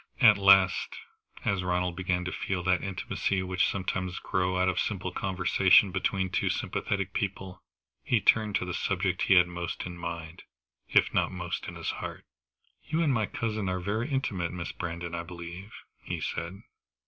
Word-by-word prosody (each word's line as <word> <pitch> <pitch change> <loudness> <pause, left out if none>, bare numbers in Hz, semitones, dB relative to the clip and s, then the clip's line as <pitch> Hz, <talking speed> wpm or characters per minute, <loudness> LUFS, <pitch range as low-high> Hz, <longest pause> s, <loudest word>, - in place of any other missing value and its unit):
At 110 -5 +8
last, 95 -1 +5 0.5
as 100 -2 +1
Ronald 90 -1 0
began 90 0 -1
to 90 - -2
feel 95 -2 -2
that 90 0 +2
intimacy 95 0 -1
which 95 0 +1
sometimes 95 -2 -2
grows 95 0 0
out 90 - +3
of 95 0 0
a - - +3
simple 95 -3 -2
conversation 95 +1 +4
between 95 0 -1
two - - +1
sympathetic 100 -2 -2
people, 95 -2 -4 0.4
he 120 - +2
turned 105 0 +3
to - - 0
the - - -4
subject - - -1
he 95 - +6
had 90 -1 +7
most 85 0 -4
in 90 0 -6
mind, 85 0 -6 0.5
if - - +4
not - - +2
most 90 -1 -4
in - - -7
his - - -3
heart. - - -7 0.6
"You 165 +2 0
and 145 -4 +2
my 110 -4 +1
cousin 110 -4 -2
are 90 0 -1
very 110 +8 -2
intimate, 100 - -1
Miss 90 -1 -5
Brandon, 85 0 -5
I 85 - -2
believe?" 85 +3 -9 0.3
he - - -4
said. 95 +5 -4
95 Hz, 175 wpm, -29 LUFS, 90-100 Hz, 0.6 s, At